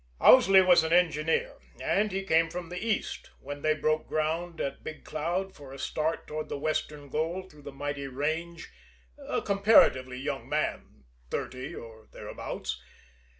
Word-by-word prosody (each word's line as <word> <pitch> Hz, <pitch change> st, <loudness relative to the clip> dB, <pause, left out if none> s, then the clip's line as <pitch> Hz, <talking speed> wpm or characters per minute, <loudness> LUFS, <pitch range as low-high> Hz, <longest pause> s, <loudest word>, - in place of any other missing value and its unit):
Owsley 195 Hz, -7 st, +8 dB
was 180 Hz, -3 st, +6 dB
an 160 Hz, -, -2 dB
engineer, 165 Hz, -, +2 dB, 0.2 s
and 210 Hz, +1 st, +1 dB
he 195 Hz, +1 st, -2 dB
came 165 Hz, -2 st, +3 dB
from 175 Hz, 0 st, -6 dB
the 180 Hz, +2 st, -5 dB
East, 225 Hz, -2 st, -2 dB
when 145 Hz, 0 st, -7 dB
they 155 Hz, +1 st, +2 dB
broke 155 Hz, 0 st, 0 dB
ground 165 Hz, +2 st, -2 dB
at 140 Hz, -, -3 dB
Big 155 Hz, -, -7 dB
Cloud 175 Hz, +5 st, -2 dB
for 140 Hz, -5 st, -12 dB
a 135 Hz, -, -9 dB
start 155 Hz, +4 st, -2 dB
toward 155 Hz, 0 st, -5 dB
the -, -, -3 dB
western 150 Hz, 0 st, -2 dB
goal 165 Hz, +6 st, -2 dB
through 150 Hz, -5 st, -17 dB
the 140 Hz, -, -8 dB
mighty 140 Hz, 0 st, -4 dB
range, 160 Hz, +5 st, -3 dB, 0.5 s
a -, -, -3 dB
comparatively 195 Hz, -, +4 dB
young 130 Hz, -, -4 dB
man 70 Hz, -, -2 dB, 0.3 s
thirty, 130 Hz, -, -4 dB
or 110 Hz, -1 st, -11 dB
thereabouts. -, -, -6 dB
155 Hz, 155 wpm, -29 LUFS, 145-180 Hz, 0.5 s, Owsley